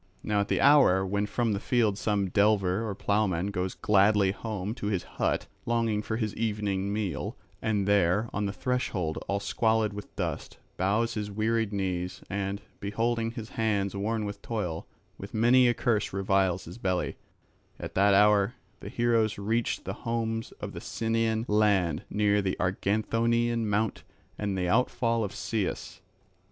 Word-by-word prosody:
Now 105 Hz, -1 st, +1 dB
at 100 Hz, -, -2 dB
the -, -, +1 dB
hour 135 Hz, -10 st, +5 dB
when 100 Hz, +2 st, -1 dB
from 115 Hz, +1 st, 0 dB
the 100 Hz, -, -1 dB
field 110 Hz, -3 st, +1 dB
some 100 Hz, -1 st, 0 dB
delver 105 Hz, +1 st, +2 dB
or 100 Hz, -, -4 dB
ploughman 100 Hz, -3 st, 0 dB
goes 90 Hz, -1 st, -2 dB
gladly 100 Hz, -1 st, +3 dB
home 105 Hz, -1 st, -4 dB
to 105 Hz, -, -5 dB
his 100 Hz, -4 st, -1 dB
hut, -, -, -1 dB, 0.2 s
longing 115 Hz, -3 st, +1 dB
for 110 Hz, +1 st, -3 dB
his 110 Hz, -3 st, -2 dB
evening 105 Hz, -3 st, -1 dB
meal, 100 Hz, -7 st, -3 dB, 0.2 s
and 105 Hz, -3 st, 0 dB
there 100 Hz, +2 st, +3 dB
on 105 Hz, 0 st, -1 dB
the -, -, -2 dB
threshold, 100 Hz, -9 st, -2 dB
all 100 Hz, -, 0 dB
squalid 110 Hz, +1 st, +1 dB
with 105 Hz, 0 st, -9 dB
dust, -, -, -4 dB, 0.2 s
bows 105 Hz, +5 st, +1 dB
his 105 Hz, -2 st, -3 dB
wearied 110 Hz, +1 st, 0 dB
knees, 90 Hz, -3 st, -3 dB
and, 100 Hz, 0 st, -2 dB, 0.2 s
beholding 115 Hz, +3 st, -1 dB
his 115 Hz, -2 st, -7 dB
hands 105 Hz, -5 st, 0 dB
worn 110 Hz, +2 st, -1 dB
with 100 Hz, 0 st, -6 dB
toil, 90 Hz, -8 st, -3 dB, 0.3 s
with 100 Hz, +3 st, -8 dB
many 120 Hz, +3 st, +5 dB
a 120 Hz, -, +4 dB
curse 110 Hz, -5 st, 0 dB
reviles 95 Hz, -2 st, +1 dB
his 85 Hz, +8 st, -10 dB
belly; 90 Hz, -4 st, -1 dB, 0.6 s
at -, -, -6 dB
that 100 Hz, +1 st, +4 dB
hour 105 Hz, +2 st, +4 dB, 0.2 s
the 100 Hz, -, -8 dB
heroes 115 Hz, -2 st, +1 dB
reached 110 Hz, +4 st, -1 dB
the 95 Hz, -, -3 dB
homes 115 Hz, -1 st, -2 dB
of -, -, -7 dB
the -, -, -8 dB
Cianian 115 Hz, 0 st, -1 dB
land 100 Hz, -6 st, +2 dB
near 105 Hz, 0 st, +2 dB
the 95 Hz, -1 st, -2 dB
Arganthonian 115 Hz, +5 st, +1 dB
mount 105 Hz, +1 st, 0 dB, 0.3 s
and 100 Hz, -2 st, -2 dB
the 90 Hz, -1 st, 0 dB
outfall 115 Hz, +2 st, +1 dB
of 100 Hz, -, -2 dB
Cius. 105 Hz, -5 st, -3 dB
105 Hz, 160 wpm, -28 LUFS, 100-115 Hz, 0.6 s, hour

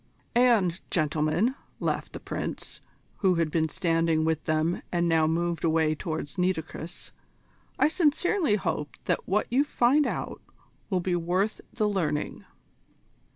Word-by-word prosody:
"And, 220 Hz, -8 st, +3 dB
gentlemen," 155 Hz, -, +1 dB, 0.3 s
laughed -, -, -2 dB
the -, -, -5 dB
Prince, -, -, -5 dB, 0.4 s
who 190 Hz, -3 st, +3 dB
had 165 Hz, -2 st, 0 dB
been 160 Hz, -1 st, +1 dB
standing 165 Hz, -2 st, +1 dB
with 160 Hz, -1 st, 0 dB
them 155 Hz, +2 st, +1 dB
and 175 Hz, -1 st, +1 dB
now 160 Hz, -1 st, +3 dB
moved 170 Hz, 0 st, -1 dB
away 160 Hz, -1 st, +3 dB
towards 155 Hz, -2 st, -4 dB
Nitocris, 175 Hz, -1 st, -3 dB, 0.7 s
"I -, -, +5 dB
sincerely 320 Hz, -, +2 dB
hope 150 Hz, -7 st, -2 dB
that -, -, -1 dB
what 205 Hz, +3 st, +2 dB
you 265 Hz, +4 st, +4 dB
find 285 Hz, +1 st, +3 dB
out -, -, -4 dB, 0.5 s
will 185 Hz, -3 st, +1 dB
be 180 Hz, 0 st, 0 dB
worth 180 Hz, +5 st, 0 dB
the 215 Hz, -3 st, +1 dB
learning." 170 Hz, -7 st, -1 dB
175 Hz, 135 wpm, -27 LUFS, 160-210 Hz, 0.7 s, I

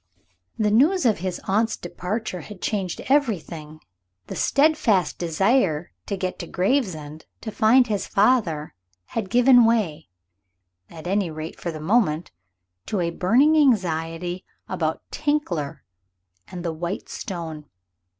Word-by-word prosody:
The 210 Hz, -1 st, +1 dB
news 305 Hz, -, +4 dB
of 220 Hz, -7 st, +3 dB
his 185 Hz, 0 st, -3 dB
aunt's 220 Hz, +3 st, +1 dB
departure 185 Hz, +2 st, -4 dB
had 200 Hz, +5 st, -11 dB
changed 190 Hz, -4 st, -2 dB
everything. 170 Hz, -, -1 dB, 0.5 s
The -, -, -7 dB
steadfast 280 Hz, -, +2 dB
desire 175 Hz, -, +1 dB, 0.2 s
to 200 Hz, -, -2 dB
get 185 Hz, -1 st, -3 dB
to 170 Hz, -, -6 dB
Gravesend, 180 Hz, -, -1 dB
to 220 Hz, -, -5 dB
find 235 Hz, +5 st, +5 dB
his 210 Hz, -4 st, -2 dB
father, 195 Hz, -9 st, +2 dB, 0.4 s
had 220 Hz, -4 st, -2 dB
given 245 Hz, +1 st, +6 dB
way, 210 Hz, -9 st, +1 dB, 0.8 s
at 160 Hz, 0 st, -11 dB
any 195 Hz, 0 st, 0 dB
rate 155 Hz, 0 st, -7 dB
for 175 Hz, -, -4 dB
the 155 Hz, -, -7 dB
moment, 175 Hz, -2 st, +1 dB, 0.6 s
to 205 Hz, -, -1 dB
a 170 Hz, -1 st, 0 dB
burning 245 Hz, -, +3 dB
anxiety 180 Hz, -, +1 dB, 0.2 s
about -, -, -2 dB
Tinkler 175 Hz, -, -2 dB, 0.6 s
and 175 Hz, -1 st, -7 dB
the 165 Hz, -, -1 dB
white 170 Hz, +4 st, -4 dB
stone. 165 Hz, -6 st, -6 dB
190 Hz, 130 wpm, -24 LUFS, 165-230 Hz, 0.8 s, given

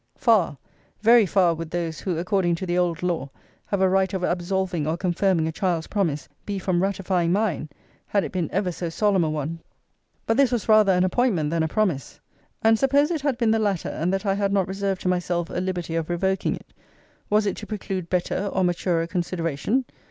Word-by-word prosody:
Far, 210 Hz, -, +3 dB, 0.5 s
very 230 Hz, -1 st, +6 dB
far, 180 Hz, -2 st, +3 dB
would 165 Hz, 0 st, -6 dB
those, 170 Hz, -2 st, -3 dB
who, 180 Hz, -4 st, -2 dB
according 180 Hz, 0 st, +1 dB
to 185 Hz, -, -5 dB
the 175 Hz, -1 st, -1 dB
old 175 Hz, -2 st, 0 dB
law, 170 Hz, -6 st, -1 dB, 0.4 s
have 200 Hz, -2 st, -1 dB
a 190 Hz, -, +5 dB
right 190 Hz, 0 st, +2 dB
of 185 Hz, -, -3 dB
absolving 180 Hz, -2 st, -1 dB
or 160 Hz, +2 st, 0 dB
confirming 175 Hz, -2 st, +1 dB
a -, -, -1 dB
child's 170 Hz, -2 st, -1 dB
promise, 165 Hz, -9 st, -1 dB, 0.2 s
be 205 Hz, -1 st, -3 dB
from 180 Hz, -2 st, 0 dB
ratifying 185 Hz, -3 st, 0 dB
mine, 190 Hz, -6 st, 0 dB, 0.4 s
had 200 Hz, -2 st, +1 dB
it -, -, -5 dB
been 175 Hz, -4 st, -2 dB
ever 185 Hz, -1 st, 0 dB
so 175 Hz, 0 st, -4 dB
solemn 195 Hz, +1 st, +2 dB
a 160 Hz, -, 0 dB
one.* 155 Hz, +2 st, -3 dB, 0.7 s
But 225 Hz, -, +1 dB
this 275 Hz, -2 st, +4 dB
was 240 Hz, -4 st, -1 dB
rather 215 Hz, -3 st, +6 dB
an 180 Hz, -1 st, +3 dB
appointment 185 Hz, -6 st, +1 dB
than 165 Hz, -1 st, +1 dB
a 160 Hz, -, +1 dB
promise: 160 Hz, -, -1 dB, 0.4 s
and 225 Hz, 0 st, +4 dB
suppose 285 Hz, +4 st, +3 dB
it 320 Hz, -4 st, -1 dB
had 280 Hz, -4 st, 0 dB
been 230 Hz, -3 st, +2 dB
the 225 Hz, -, +2 dB
latter; 200 Hz, -5 st, 0 dB
and 170 Hz, +3 st, -1 dB
that 195 Hz, +2 st, -2 dB
I 195 Hz, -, +2 dB
had 200 Hz, 0 st, 0 dB
not 195 Hz, -2 st, +1 dB
reserved 195 Hz, 0 st, -2 dB
to -, -, -3 dB
myself 175 Hz, -1 st, -1 dB
a 175 Hz, -, -2 dB
liberty 180 Hz, -3 st, -3 dB
of 165 Hz, 0 st, -2 dB
revoking 190 Hz, +2 st, 0 dB
it; -, -, -15 dB, 0.6 s
was 210 Hz, 0 st, +3 dB
it 200 Hz, -, 0 dB
to 215 Hz, -, -8 dB
preclude 190 Hz, -4 st, -4 dB
better 185 Hz, +2 st, -1 dB
or 190 Hz, -, +1 dB
maturer 175 Hz, -1 st, +1 dB
consideration? 170 Hz, -, -1 dB
185 Hz, 210 wpm, -24 LUFS, 170-200 Hz, 0.7 s, very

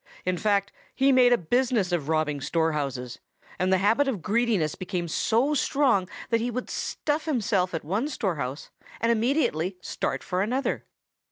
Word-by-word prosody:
In 185 Hz, 0 st, +1 dB
fact, 200 Hz, +1 st, +1 dB, 0.2 s
he 275 Hz, +1 st, +4 dB
made 250 Hz, -2 st, +6 dB
a 245 Hz, -, +6 dB
business 235 Hz, 0 st, +1 dB
of 160 Hz, -4 st, -1 dB
robbing 155 Hz, -3 st, 0 dB
storehouses, 145 Hz, -6 st, -1 dB, 0.4 s
and 185 Hz, +1 st, +1 dB
the 190 Hz, -, +5 dB
habit 220 Hz, +9 st, +3 dB
of 215 Hz, -, -2 dB
greediness 210 Hz, -7 st, +1 dB
became 180 Hz, -2 st, -4 dB
so 235 Hz, -, +1 dB
strong 260 Hz, -9 st, +2 dB, 0.2 s
that 230 Hz, -1 st, +3 dB
he 240 Hz, -, -1 dB
would 250 Hz, +1 st, -4 dB
stuff 300 Hz, +1 st, -2 dB
himself 205 Hz, -, 0 dB
at 160 Hz, -, -4 dB
one 210 Hz, -, -1 dB
storehouse 150 Hz, -, -3 dB, 0.3 s
and 230 Hz, +1 st, +2 dB
immediately 220 Hz, -, +1 dB
start -, -, -3 dB
for 180 Hz, +1 st, -1 dB
another. 250 Hz, +7 st, -1 dB
200 Hz, 160 wpm, -26 LUFS, 165-245 Hz, 0.4 s, made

